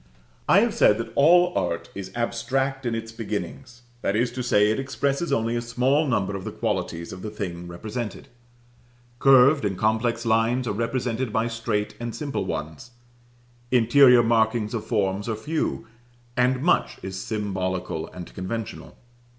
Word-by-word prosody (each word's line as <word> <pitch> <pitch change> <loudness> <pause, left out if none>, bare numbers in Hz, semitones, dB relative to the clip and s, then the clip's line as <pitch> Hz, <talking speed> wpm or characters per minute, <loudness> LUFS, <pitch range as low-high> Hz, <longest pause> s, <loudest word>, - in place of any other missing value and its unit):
I - - +7
have - - +1
said - - +4
that - - -5
all 175 +5 +5
art 85 -1 -2
is 95 -1 -7
abstract 130 +3 -1
in 115 - -1
its 115 0 -5
beginnings; 115 +3 -6 0.2
that 100 - 0
is 120 +2 +1
to 125 - -4
say, 105 -3 +3
it 110 - -1
expresses 140 +4 -1
only 115 +1 +1
a 120 - -1
small 130 +6 +1
number 100 -6 0
of 95 - -5
the - - -5
qualities 85 +1 -3
of 90 - -9
the 110 - -5
thing 90 -5 -6
represented. 110 +7 -6 0.9
Curved 135 +2 +6
and 100 -3 -1
complex 115 +3 0
lines 115 +3 +2
are - - -1
represented 115 +1 -2
by 110 +2 +1
straight 115 -2 -2
and 120 -1 -5
simple 145 -3 -3
ones; 75 - -5 0.8
interior 125 +1 +6
markings 110 -1 +1
of 115 - -4
forms 100 -1 0
are 110 - -1
few, 150 +9 -2 0.5
and 125 +1 +2
much 175 - +2
is 95 0 -5
symbolical 95 -6 -3
and 90 -1 -10
conventional. 105 +4 -6
115 Hz, 160 wpm, -24 LUFS, 105-125 Hz, 0.9 s, I